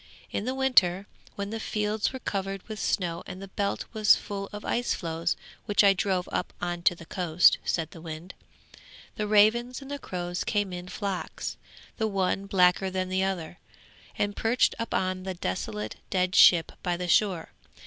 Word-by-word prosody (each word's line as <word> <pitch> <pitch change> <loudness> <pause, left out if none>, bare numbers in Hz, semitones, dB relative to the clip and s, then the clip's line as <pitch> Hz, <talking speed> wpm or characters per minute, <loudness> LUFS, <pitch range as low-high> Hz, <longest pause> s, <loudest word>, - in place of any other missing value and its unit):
In 205 - -2
the 255 +1 -1
winter, 200 -9 +3 0.3
when 200 0 -4
the 225 - -3
fields 210 0 -1
were 260 - -5
covered 195 -5 -4
with 215 -1 -6
snow 170 -3 -1
and 185 - -7
the 195 0 -9
Belt 200 +1 -2
was 215 -1 +6
full 200 -1 -5
of 210 0 -8
ice 240 0 0
floes 165 0 -2 0.3
which 205 0 +4
I 200 -1 +7
drove 185 -1 0
up - - -2
on 175 -1 -3
to 175 - -9
the 170 - -12
coast,' 175 -1 +4
said 165 -2 -1
the 165 - -11
wind, 165 +2 -7 0.8
'the 210 - -1
ravens 220 +4 +4
and 280 0 -7
crows 175 -1 -3
came 205 -3 -1
in 180 0 -6
flocks, 200 -2 -4 0.4
the 220 - +1
one 195 -1 0
blacker 185 0 +3
than 185 0 -2
the 190 0 +1
other, 175 -3 -3 0.6
and 205 0 0
perched 230 +2 +2
upon 185 -5 -1
the 190 0 -4
desolate, 105 - -4
dead 185 -1 +1
ship 170 -2 +7
by 175 -1 -1
the 180 0 -3
shore. 180 -2 +2
190 Hz, 175 wpm, -27 LUFS, 175-210 Hz, 0.8 s, I